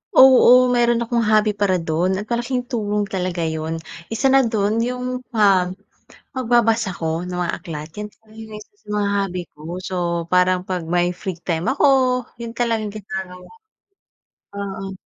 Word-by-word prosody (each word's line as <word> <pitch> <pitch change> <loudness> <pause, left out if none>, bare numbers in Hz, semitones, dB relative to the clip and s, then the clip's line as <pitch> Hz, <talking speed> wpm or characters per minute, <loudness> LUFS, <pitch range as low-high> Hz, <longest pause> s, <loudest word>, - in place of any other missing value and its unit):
Oo. 255 -1 +7
Meron 235 -1 +2
akong 235 0 0
hobby 215 0 +4
para 205 -2 +1
dun 170 +4 0
at 205 - -4
malaking 245 +1 -1
tulong 210 -3 -1
talaga 180 -2 -2
yun. 160 0 -2 0.3
Isa 245 +4 +1
na 270 - +6
dun 215 0 0
yung, 250 +1 -2 0.2
ah, 195 -4 +4 0.7
magbabasa 230 -4 +2
ako 165 0 -3
ng 180 0 -6
mga 175 -1 -1
aklat, 155 -4 -7
yan 210 0 -5
talaga 220 0 -22
yung 220 -1 -10
isa - - -17
sa - - -27
mga 205 -1 0
hobby 185 -3 -2
ko. - - -20 0.2
So, 185 0 -5 0.3
parang 180 0 +3
'pag 180 -3 -2
may 175 +1 +1
free 185 -2 -5
time 170 -1 -2
ako, 290 - +2 0.5
yun 235 -1 -6
talagang 225 -3 -1
ginagawa. 190 -3 -7 1.1
Oo. 195 -1 -5
205 Hz, 160 wpm, -21 LUFS, 180-230 Hz, 1.1 s, Oo